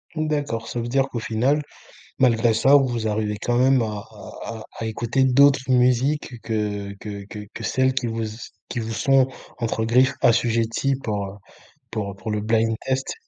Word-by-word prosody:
Mmh, 155 -1 -1
d'accord. 145 -7 -2
Ça 120 - -4
veut 115 - -3
dire 135 +2 +2
qu'au 120 - -4
final, 125 +7 +1 0.6
malgré 120 -3 +4
ça 135 +5 +5
vous 120 -5 +1
arrivez 105 0 -1
quand 120 +1 0
même 130 0 +4
à - - 0 0.2
à 110 -2 -12 0.2
à 110 - -10 0.2
à 115 - -2
écouter 120 +4 0
d'autres 135 +1 +5
musiques 125 +1 +2
que 105 -3 -3
que 100 -2 -7
que 105 0 -8
que - - -7
celles 130 0 +1
qui 130 -2 -1
vous 115 0 -2
s 110 +2 -8 0.2
qui 120 - -3
vous 115 0 -4
sont, 135 +3 +3 0.3
entre 115 -1 -1
griffes, 130 +4 +3
assujetties 115 +3 +2
pour 105 -2 -2
heu 95 - -8 0.6
pour 105 -3 -3
heu - - -11
pour 110 +2 -5
le 105 0 -1
blind 115 +1 +1
test. 130 0 -1
115 Hz, 190 wpm, -23 LUFS, 110-130 Hz, 0.6 s, ça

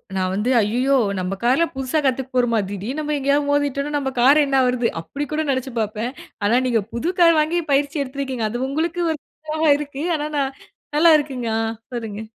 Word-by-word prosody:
நா 190 - 0
வந்து 210 +6 -1
ஐய்யயோ! 250 +6 +2 0.2
நம்ப 185 +2 -2
கார்ல 265 +8 +3
புதுசா 265 +3 -1
கத்துக்க 265 0 0
போறமா? 240 -3 +2
திடீர்னு 210 +9 -4
நம்ம 300 0 -1
எங்கேயாவது 285 +1 +1
மோதிட்டோம்னா 285 0 0
நம்ப 270 -2 -2
கார் 290 +4 +6
என்ன 270 -1 +2
ஆவறது? 250 -2 +1
அப்படி 285 - -5
கூட 315 +1 0
நெனச்சு 260 -1 -1
பாப்பேன். 215 +3 -3 0.3
ஆனா 235 +4 +4
நீங்க 230 -3 +2
புது 310 +10 -1
கார் 335 -2 +6
வாங்கி 325 +3 +1
பயிற்சி 285 +1 +1
எடுத்திருக்கிறீங்க. 260 -4 -3
அது 240 +3 -2
உங்களுக்கு 330 +4 -1
ஒரு 310 - -3 0.3
இதா 310 -1 +2
இருக்கு. 285 0 -5
ஆனா 300 0 -2
ந - - +2 0.6
நல்லா 335 +2 +6
இருக்குங்க. 260 -5 -4
ஆ - - +1 0.3
சொல்லுங்க. 220 -3 -5
270 Hz, 185 wpm, -21 LUFS, 240-295 Hz, 0.6 s, கார்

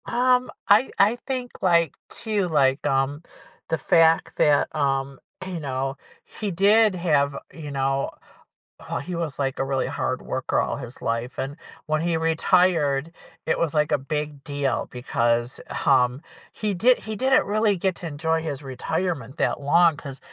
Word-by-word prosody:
Um, 250 +1 +2 0.2
I 215 +6 +5
I 210 +4 +4
think, 255 -2 -3
like, 170 -4 +3 0.2
too, 210 -4 -2
like, 135 -4 +2
um, 135 +2 0 0.5
the 160 - +1
fact 165 +2 +3
that, 145 -1 +3
um, 135 -2 -1 0.3
you 185 -3 -5
know, 135 -2 -3 0.3
he 210 - -5
did 205 +3 +4
have, 145 -5 +1 0.2
you 150 -3 -8
know 135 0 -1 0.8
Oh, - - -2
he 175 +5 -6
was, 165 -4 -3
like, 135 -2 -1
a - - +2
really 135 -1 0
hard 130 - -2
worker 130 - -1
all - - -2
his 125 -2 -9
life, 115 +2 -2
and 135 +2 -3 0.3
when 155 0 0
he 170 0 0
retired, 165 -3 +2 0.3
it - - 0
was 165 -2 0
like 150 0 +2
a - - +4
big 150 0 -4
deal 145 -1 -2
because, 120 -1 -1 0.3
um, 130 0 +3 0.3
he 210 -2 -2
did 240 +8 +4
he 220 0 -6
didn't 265 +5 +3
really 210 -1 +2
get 190 +2 0
to 175 - -6
enjoy 160 +2 -1
his 145 -3 -5
retirement 140 0 -3
that - - 0
long 165 +2 +4
'cause 135 -3 -9
155 Hz, 160 wpm, -24 LUFS, 135-180 Hz, 0.8 s, I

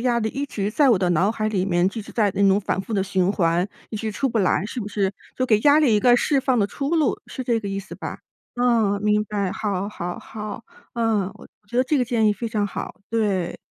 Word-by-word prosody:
压 240 -1 +2
力 220 -1 -1
一 280 +1 -3
直 205 -7 -3
在 275 +6 +3
我 210 - +4
的 180 - +1
脑 180 +5 +3
海 215 -1 -2
里 190 -3 0
面， 175 -2 +2
一 225 - -4
直 - - -12
在 215 -3 +2
那 200 0 +3
种 195 +2 +3
反 195 - -1
复 225 - -7
地 195 -3 +1
循 190 -1 +1
环， 175 -2 +1 0.2
一 215 - -4
直 220 +1 -3
出 270 +6 -1
不 230 -2 0
来， 185 0 +2
是 240 +2 -5
不 205 - -5
是？ 200 -2 0 0.2
就 255 - 0
给 215 -3 +3
压 290 +4 +6
力 280 -8 +4
一 210 - +3
个 245 +2 +5
释 275 +2 +2
放 260 -2 +1
的 205 - +3
出 275 +7 -4
路， 300 -5 +2
是 260 - -6
这 235 -2 +1
个 200 - -5
意 195 0 -2
思 200 - -8
吧？ - - -6 0.4
嗯， 230 -5 +2
明 210 0 +3
白， 200 -3 -2
好， 200 -2 -2
好， 175 -4 -5
好。 215 0 -7 0.3
嗯， 220 -5 +1
我 - - -14 0.2
觉 240 - -5
得 255 - +4
这 295 +4 +1
个 250 - +2
建 230 -3 +1
议 210 - +4
非 230 +3 -4
常 210 -2 0
好， - - -5 0.2
对。 200 -6 0
210 Hz, 280 characters per minute, -23 LUFS, 195-240 Hz, 0.4 s, 压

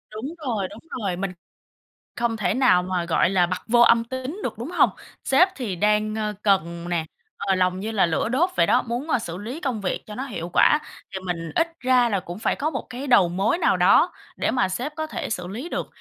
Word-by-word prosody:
Đúng 220 +4 -5 0.2
rồi, 210 -6 -1
đúng - - -12 0.2
rồi, 195 -4 -2
mình 190 0 -3 0.9
không 235 -1 0
thể 200 -1 0
nào 185 -9 +4
mà, 180 -1 -2
gọi 170 +1 +2
là, 180 -2 +3
bặt 185 +1 -4
vô 240 +1 +4
âm 230 -1 +6
tín 260 +7 -5
được, - - -4
đúng 250 +9 -5
hông? 355 - +4 0.3
Sếp 275 +8 +5
thì 215 -9 -3
đang, 210 +2 +1
ơ, 210 -1 -2
cần 170 -4 +1
nè, 165 -2 -1 0.3
ờ, 195 -1 0
lòng 185 0 +1
như 220 +2 -3
là 200 -5 +3
lửa 165 +6 0
đốt 325 +9 +2
vậy - - +4
đó, - - +3
muốn, 245 +6 -4
ơ, - - +3
xử 175 -5 -6
lý 245 +10 -6
công 250 -6 -2
việc 185 - -2
cho 210 - -8
nó 260 - -4
hiệu 175 -8 -5
quả, 300 - +5 0.3
thì 190 - -3
mình 165 -2 -3
ít 330 0 +2
ra 250 -2 +3
là 200 -4 0
cũng 175 +3 -8
phải - - 0
có 305 +3 -1
một 270 - -5
cái 255 +3 -6
đầu 200 -9 +5
mối 195 - 0
nào - - +3
đó - - +5 0.2
để - - 0
mà 250 -7 +1
sếp 255 +10 -3
có 315 0 -2
thể - - -5
xử 180 -5 -3
lý 235 - -6
được, - - -3
215 Hz, 240 wpm, -24 LUFS, 185-255 Hz, 0.9 s, âm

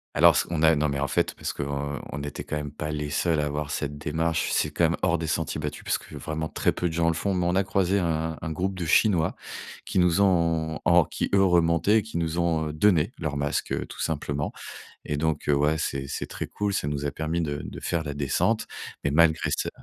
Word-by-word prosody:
Alors - - +7
ce - - +2
qu'on 85 -2 -2
a 80 0 +6
non, 75 0 +1
mais 70 - -2
en 70 - 0
fait, - - 0
parce - - -4
qu'on 70 0 -3
on - - -5
n'était 75 0 -5
quand - - -4
même 75 -1 -4
pas 75 +1 -4
les 75 -1 -3
seuls 80 +1 +1
à 75 - +1
avoir 75 0 -3
cette 75 0 -3
démarche. 80 +2 -1
C'est - - +1
quand - - -1
même - - -1
hors 85 - +2
des 80 - -3
sentiers 80 -1 -1
battus 75 -1 -5
parce - - +1
que - - -12
vraiment 80 0 -3
très - - +1
peu 90 - -1
de 80 - -4
gens 85 0 +1
le 85 - +2
font. 100 +4 -1
Mais 90 -1 0
on 90 - +1
a 95 - +3
croisé 95 0 +1
un 80 -3 -1
un 80 0 -4
groupe 95 +4 -2
de 90 -2 -3
Chinois 85 -1 +3 0.5
qui - - -3
nous 90 +1 +4
ont 80 -4 +2
en 85 -1 +6
qui, - - -3
eux, 95 -1 +5
remontaient, 90 +4 +3
qui 110 -6 -4
nous 80 0 -2
ont 80 -3 +1
donné 90 +2 +3
leur 75 -3 -3
masque, 70 0 -1
tout - - -8
simplement. 75 -2 -2 0.5
Et 75 - -2
donc, 80 -1 0
ouais, 75 +2 +3
c'est 70 -2 -2
c'est - - -3
très - - -5
cool. 105 -1 -2
Ça 75 - -1
nous 75 -1 -3
a 70 - 0
permis 80 +3 -2
de 75 -2 -2
de - - -7
faire 85 -2 -1
la 75 -2 -5
descente. 75 - +1 0.4
Mais 70 - +2
malgré 80 +1 +3
ça - - -2
80 Hz, 240 wpm, -26 LUFS, 75-85 Hz, 0.5 s, Alors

